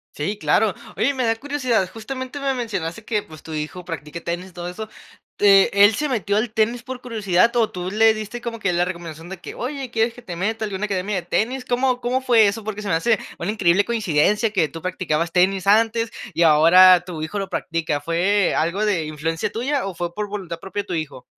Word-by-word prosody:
Sí, 200 Hz, +8 st, -3 dB
claro. 210 Hz, -1 st, +2 dB, 0.2 s
Oye, 245 Hz, +8 st, +1 dB
me 255 Hz, -2 st, -1 dB
da 225 Hz, 0 st, +2 dB
curiosidad. 255 Hz, -7 st, 0 dB
Justamente 260 Hz, +4 st, -6 dB
me 275 Hz, -1 st, 0 dB
mencionaste 215 Hz, -4 st, -4 dB
que, 210 Hz, -3 st, -1 dB
pues, 155 Hz, -1 st, -14 dB
tu 160 Hz, -, -9 dB
hijo 155 Hz, +4 st, -5 dB
practica 165 Hz, -1 st, -6 dB
tenis, 175 Hz, +3 st, -5 dB
todo 175 Hz, 0 st, -6 dB
eso. 215 Hz, +5 st, -6 dB, 0.5 s
Eh, 195 Hz, -1 st, +6 dB
¿él 205 Hz, +2 st, +6 dB
se 300 Hz, +7 st, -1 dB
metió 210 Hz, -5 st, 0 dB
al 220 Hz, +1 st, 0 dB
tenis 230 Hz, +2 st, 0 dB
por 255 Hz, 0 st, -7 dB
curiosidad 225 Hz, -2 st, +1 dB
o 225 Hz, -2 st, +3 dB
tú 180 Hz, 0 st, -5 dB
le 220 Hz, +1 st, +5 dB
diste 215 Hz, +2 st, -6 dB
como 235 Hz, -1 st, -5 dB
que 195 Hz, -4 st, 0 dB
la 175 Hz, +1 st, +2 dB
recomendación? 170 Hz, -2 st, -7 dB
De 190 Hz, -, -6 dB
que, -, -, -8 dB
"oye, 265 Hz, 0 st, -5 dB
quieres 225 Hz, +1 st, +1 dB
que 245 Hz, -, -13 dB
te 175 Hz, -, -7 dB
meta 220 Hz, +5 st, -2 dB
a -, -, -1 dB
alguna 205 Hz, +1 st, -3 dB
academia 195 Hz, 0 st, -2 dB
de 180 Hz, -, -2 dB
tenis?" 245 Hz, +8 st, -1 dB
¿Cómo 250 Hz, 0 st, 0 dB
cómo 250 Hz, +2 st, 0 dB
fue 230 Hz, -5 st, +5 dB
eso? 215 Hz, +2 st, -3 dB
Porque 210 Hz, -1 st, -5 dB
se 205 Hz, -, -5 dB
me 180 Hz, -, +2 dB
hace 215 Hz, +6 st, +2 dB, 0.2 s
una 175 Hz, +5 st, -2 dB
increíble 200 Hz, -2 st, +3 dB
coincidencia 210 Hz, 0 st, +1 dB
que 170 Hz, -7 st, +2 dB
tú 165 Hz, -, -9 dB
practicabas 170 Hz, -3 st, -1 dB
tenis 185 Hz, +1 st, +2 dB
antes 225 Hz, +2 st, +3 dB, 0.2 s
y 170 Hz, -, +1 dB
ahora 175 Hz, +3 st, +7 dB
tu 165 Hz, -4 st, -6 dB
hijo 170 Hz, +6 st, -4 dB
lo 195 Hz, -1 st, -3 dB
practica, 165 Hz, -3 st, -2 dB
¿fue 180 Hz, +6 st, +1 dB
algo 175 Hz, +7 st, 0 dB
de 185 Hz, -7 st, +1 dB
influencia 155 Hz, +2 st, -3 dB
tuya?, 260 Hz, 0 st, -1 dB
o, 195 Hz, -, -5 dB
¿fue 170 Hz, 0 st, -4 dB
por 210 Hz, +2 st, -4 dB
voluntad 190 Hz, -5 st, -5 dB
propia 195 Hz, +3 st, -5 dB
tu 180 Hz, -, -5 dB
hijo? 150 Hz, -6 st, -5 dB
200 Hz, 220 wpm, -22 LUFS, 175-225 Hz, 0.5 s, ahora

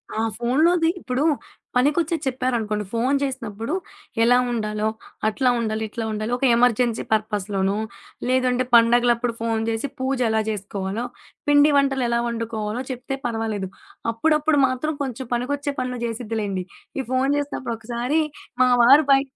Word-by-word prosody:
ఆ! -, -, -1 dB, 0.2 s
ఫోను‌లోది 325 Hz, +8 st, +3 dB
ఇప్పుడు 255 Hz, -2 st, -1 dB, 0.5 s
పనికొచ్చే 295 Hz, +6 st, +2 dB
చెప్పారనుకోండి. 240 Hz, -5 st, -1 dB
ఫోను 250 Hz, +5 st, +1 dB
చేసినప్పుడు 230 Hz, -2 st, -4 dB, 0.5 s
ఎలా 245 Hz, +2 st, +5 dB
ఉండాలో, 215 Hz, -2 st, -1 dB, 0.4 s
అట్లా 250 Hz, +4 st, +2 dB
ఉండాలి, 220 Hz, -1 st, -1 dB
ఇట్లా 225 Hz, +1 st, -4 dB
ఉండాలి 215 Hz, +2 st, -3 dB
ఒక 270 Hz, -, 0 dB
ఎమర్జెన్సీ 240 Hz, -1 st, +2 dB
పర్పస్‌లోనొ, 205 Hz, -2 st, 0 dB, 0.5 s
లేదంటే 255 Hz, -1 st, +2 dB
పడుగలప్పుడు 240 Hz, 0 st, +4 dB
ఫోను 225 Hz, -1 st, 0 dB
జేసి 225 Hz, +4 st, -1 dB
పూజ 265 Hz, +1 st, 0 dB
ఎలా 220 Hz, 0 st, +2 dB
జేసుకోవాలో, 200 Hz, +1 st, -3 dB, 0.5 s
పిండి 290 Hz, +1 st, +6 dB
వంటలు 270 Hz, -2 st, +2 dB
ఎలా 235 Hz, 0 st, +2 dB
వండుకోవాలో 230 Hz, -1 st, -3 dB
చెప్తే 260 Hz, +2 st, -4 dB
పర్వాలేదు. 225 Hz, -4 st, -2 dB, 0.4 s
అప్పుడప్పుడు 305 Hz, +5 st, +2 dB
మాత్రం 255 Hz, +5 st, -2 dB
కొంచెం 260 Hz, -1 st, -5 dB
పనికొచ్చే 285 Hz, +4 st, -1 dB
పనులు 250 Hz, -1 st, -3 dB
చేసిద్దిలెండి. 215 Hz, -5 st, -3 dB, 0.4 s
ఈ -, -, +2 dB
ఫోను 260 Hz, +1 st, +2 dB
చేసినప్పుడు 280 Hz, -4 st, -3 dB
ఒకసారి 240 Hz, +7 st, 0 dB, 0.4 s
మా 255 Hz, -, +4 dB
వారు 280 Hz, +5 st, +7 dB
బయ 270 Hz, 0 st, +6 dB
240 Hz, 130 wpm, -23 LUFS, 220-265 Hz, 0.5 s, వారు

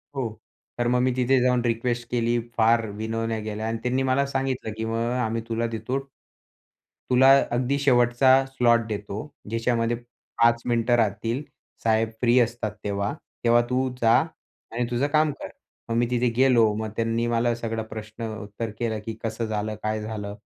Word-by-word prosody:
हो 135 Hz, -, -1 dB, 0.5 s
तर 120 Hz, 0 st, 0 dB
मग 125 Hz, +1 st, +2 dB
मी 130 Hz, 0 st, +2 dB
तिथे 130 Hz, +1 st, +3 dB
जाऊन 125 Hz, -1 st, +3 dB
रिक्वेस्ट 120 Hz, 0 st, -1 dB
केली, 120 Hz, 0 st, +1 dB, 0.2 s
फार 115 Hz, 0 st, +4 dB
विनवण्या 110 Hz, +2 st, -3 dB
केल्या 110 Hz, +1 st, -4 dB
आणि 115 Hz, -, -1 dB
त्यांनी 130 Hz, +2 st, +1 dB
मला 135 Hz, +1 st, +2 dB
सांगितलं, 135 Hz, -4 st, -2 dB
"की 110 Hz, -, -2 dB
मग 115 Hz, +1 st, -1 dB
आम्ही 115 Hz, -1 st, -1 dB
तुला 115 Hz, +1 st, 0 dB
देतो 115 Hz, +4 st, -3 dB, 1.1 s
तुला 130 Hz, +1 st, +6 dB, 0.2 s
अगदी 125 Hz, +3 st, +1 dB
शेवटचा 130 Hz, 0 st, +4 dB
स्लॉट 120 Hz, -3 st, +2 dB
देतो." 105 Hz, -1 st, -5 dB, 0.3 s
ज्याच्यामध्ये 115 Hz, 0 st, 0 dB
5 120 Hz, 0 st, 0 dB
मिनिटं 120 Hz, 0 st, +2 dB
राहतील 115 Hz, +4 st, 0 dB, 0.4 s
साहेब 110 Hz, 0 st, +2 dB
फ्री 120 Hz, +1 st, +4 dB
असतात 115 Hz, -3 st, 0 dB
तेव्हा. 100 Hz, +1 st, -1 dB, 0.3 s
तेव्हा 120 Hz, 0 st, +5 dB
तू 130 Hz, +1 st, +1 dB
जा 115 Hz, -1 st, +5 dB, 0.6 s
आणि 120 Hz, +1 st, -1 dB
तुझं 125 Hz, +4 st, +1 dB
काम 155 Hz, 0 st, +2 dB
कर." -, -, -5 dB, 0.4 s
मग 115 Hz, -, 0 dB
मी 120 Hz, -, +3 dB
तिथे 125 Hz, 0 st, +2 dB
गेलो. 120 Hz, -5 st, +5 dB
मग 110 Hz, 0 st, -3 dB
त्यांनी 115 Hz, +1 st, 0 dB
मला 120 Hz, 0 st, +1 dB
सगळं 115 Hz, -1 st, -3 dB
प्रश्न 110 Hz, +1 st, -7 dB
उत्तर 105 Hz, +2 st, -5 dB
केलं, 110 Hz, -2 st, -1 dB
"की 115 Hz, -, -3 dB
कसं 115 Hz, +1 st, -2 dB
झालं? 110 Hz, 0 st, -2 dB
काय 110 Hz, 0 st, -1 dB
झालं?" 105 Hz, -1 st, -5 dB
115 Hz, 165 wpm, -25 LUFS, 110-125 Hz, 1.1 s, तुला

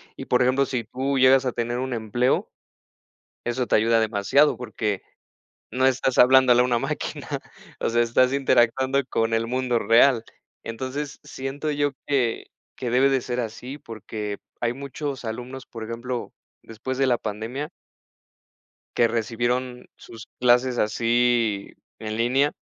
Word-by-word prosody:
y, -, -, -7 dB
por 125 Hz, -, +2 dB
ejemplo, 130 Hz, +2 st, +3 dB
si 125 Hz, -4 st, -3 dB
tú 135 Hz, +4 st, -2 dB
llegas 130 Hz, +1 st, +5 dB
a 125 Hz, -, +1 dB
tener 120 Hz, +1 st, -2 dB
un 130 Hz, 0 st, -3 dB
empleo 120 Hz, +3 st, 0 dB, 1.0 s
eso 120 Hz, +1 st, -1 dB
te -, -, +3 dB
ayuda 115 Hz, +1 st, +3 dB
demasiado 110 Hz, +5 st, +2 dB
porque 110 Hz, -4 st, -3 dB, 0.7 s
no 130 Hz, +1 st, +2 dB
estás 130 Hz, 0 st, +1 dB
hablándole 125 Hz, -1 st, +6 dB
a -, -, +4 dB
una 120 Hz, -1 st, +1 dB
máquina. -, -, -4 dB, 0.5 s
O -, -, 0 dB
sea, 120 Hz, +1 st, +2 dB
estás 125 Hz, +3 st, +2 dB
interactuando 130 Hz, 0 st, +2 dB
con 115 Hz, 0 st, 0 dB
el 115 Hz, 0 st, 0 dB
mundo 125 Hz, 0 st, 0 dB
real. 115 Hz, +2 st, +4 dB, 0.4 s
Entonces, 130 Hz, +5 st, -5 dB
siento 135 Hz, +3 st, -5 dB
yo 145 Hz, 0 st, 0 dB, 0.2 s
que 130 Hz, -5 st, 0 dB, 0.3 s
que 125 Hz, -, -3 dB
debe 130 Hz, +3 st, +4 dB
de 135 Hz, -1 st, +1 dB
ser 125 Hz, 0 st, -3 dB
así 120 Hz, +4 st, -6 dB
porque 105 Hz, -3 st, -6 dB, 0.2 s
hay 120 Hz, 0 st, +1 dB
muchos 140 Hz, 0 st, -5 dB
alumnos, 125 Hz, +4 st, -6 dB
por 115 Hz, -1 st, -8 dB
ejemplo, 120 Hz, +2 st, -5 dB, 0.3 s
después 125 Hz, +4 st, -6 dB
de 135 Hz, -, +3 dB
la 125 Hz, -2 st, +3 dB
pandemia 115 Hz, +8 st, -5 dB, 1.3 s
que 120 Hz, -, +4 dB
recibieron 120 Hz, +2 st, -2 dB
sus 115 Hz, -1 st, -12 dB
clases 125 Hz, 0 st, +3 dB
así 115 Hz, -1 st, +1 dB, 0.3 s
en 110 Hz, -1 st, -5 dB
línea, 130 Hz, +5 st, +2 dB
125 Hz, 145 wpm, -24 LUFS, 115-130 Hz, 1.3 s, hablándole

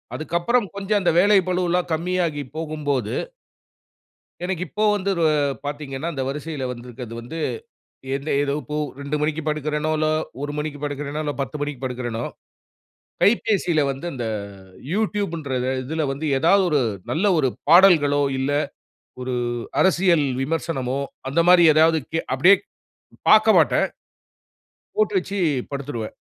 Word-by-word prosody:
அதுக்கப்புறம் 175 Hz, +9 st, 0 dB
கொஞ்சம் 200 Hz, +1 st, 0 dB
அந்த 175 Hz, -, +3 dB
வேலை 205 Hz, +2 st, +5 dB
பளுவலாம் 180 Hz, -1 st, 0 dB
கம்மியாகி 170 Hz, -2 st, -1 dB, 0.2 s
போகும்போது 145 Hz, -8 st, -2 dB, 1.3 s
எனக்கு 185 Hz, -1 st, -2 dB
இப்போ 215 Hz, +8 st, -1 dB
வந்து 200 Hz, 0 st, -1 dB
ரு 165 Hz, -, +2 dB, 0.4 s
பார்த்தீங்கன்னா, 145 Hz, +1 st, -4 dB
அந்த 135 Hz, -2 st, -3 dB
வரிசையில 150 Hz, 0 st, -4 dB
வந்திருக்கிறது 120 Hz, -1 st, -9 dB
வந்து, 125 Hz, +8 st, -8 dB, 0.8 s
எந்த 140 Hz, +3 st, -5 dB
ஏதோ 140 Hz, -1 st, -1 dB
இப்போ 150 Hz, +4 st, -5 dB, 0.2 s
2:00 140 Hz, +1 st, -3 dB
மணிக்கு 155 Hz, +1 st, 0 dB
படுக்கிறேனோ! 150 Hz, +1 st, -1 dB
இல்ல 155 Hz, 0 st, +1 dB, 0.3 s
1:00 145 Hz, 0 st, -3 dB
மணிக்கு 150 Hz, -1 st, -4 dB
படுக்கிறேனோ, 145 Hz, +1 st, -3 dB
இல்ல 145 Hz, -, -1 dB
10:00 145 Hz, +2 st, -4 dB
மணிக்கு 145 Hz, -3 st, -4 dB
படுக்கிறேனோ, 120 Hz, -2 st, -3 dB, 1.0 s
கைப்பேசியில 195 Hz, -6 st, +2 dB
வந்து 135 Hz, +5 st, -7 dB
அந்த 125 Hz, -3 st, -4 dB, 0.7 s
யூட்யூப்ன்றத 170 Hz, -, -1 dB, 0.2 s
இதில 155 Hz, +3 st, -2 dB
வந்து 140 Hz, +3 st, -4 dB
ஏதாவது 190 Hz, +7 st, +4 dB
1 150 Hz, -, +3 dB, 0.3 s
நல்ல 170 Hz, +6 st, 0 dB
1 135 Hz, -4 st, +2 dB, 0.2 s
பாடல்களோ, 160 Hz, -5 st, +6 dB, 0.2 s
இல்ல 135 Hz, +2 st, 0 dB, 0.7 s
1 125 Hz, 0 st, -3 dB, 0.5 s
அரசியல் 175 Hz, -5 st, +3 dB, 0.2 s
விமர்சனமோ, 135 Hz, -3 st, -2 dB, 0.3 s
அந்தமாரி 175 Hz, +4 st, +5 dB
ஏதாவது 160 Hz, 0 st, +4 dB
கே 165 Hz, -, +1 dB
அப்பிடியே 185 Hz, +9 st, +6 dB, 0.7 s
பார்க்க -, -, +7 dB
மாட்டேன். -, -, +3 dB, 1.1 s
போட்டு 430 Hz, -1 st, +1 dB
வச்சு 200 Hz, -, -4 dB, 0.3 s
படுத்துருவேன். 135 Hz, -6 st, -5 dB
155 Hz, 125 wpm, -22 LUFS, 140-175 Hz, 1.3 s, பார்க்க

